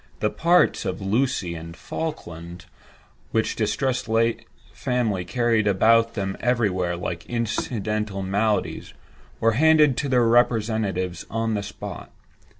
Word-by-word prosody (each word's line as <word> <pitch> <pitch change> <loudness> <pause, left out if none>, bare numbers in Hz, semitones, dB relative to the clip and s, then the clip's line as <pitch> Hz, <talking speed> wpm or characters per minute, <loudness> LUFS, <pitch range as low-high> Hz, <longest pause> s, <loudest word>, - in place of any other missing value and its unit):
The 105 - 0
"parts" 175 +2 +3
of 90 - -3
"Lucy" 105 -2 0
and 85 0 -8
"Falkland" 85 - -6 0.6
(which 110 0 0
the 110 - 0
distressed 125 +3 -1 0.6
family 110 -8 -1
carried 115 +1 +1
about 115 +4 +5
with 115 - -21
them 95 -2 -3
everywhere, 95 -8 0
like 85 -1 -4
incidental 105 -3 -2
maladies) 105 +3 -1 0.4
were 115 - +3
handed 150 +1 +4
to 145 - -1
their 125 -2 +3
representatives 110 -6 +1
on 115 0 -1
the 105 - -1
spot. 100 - -8
110 Hz, 125 wpm, -24 LUFS, 95-120 Hz, 0.6 s, about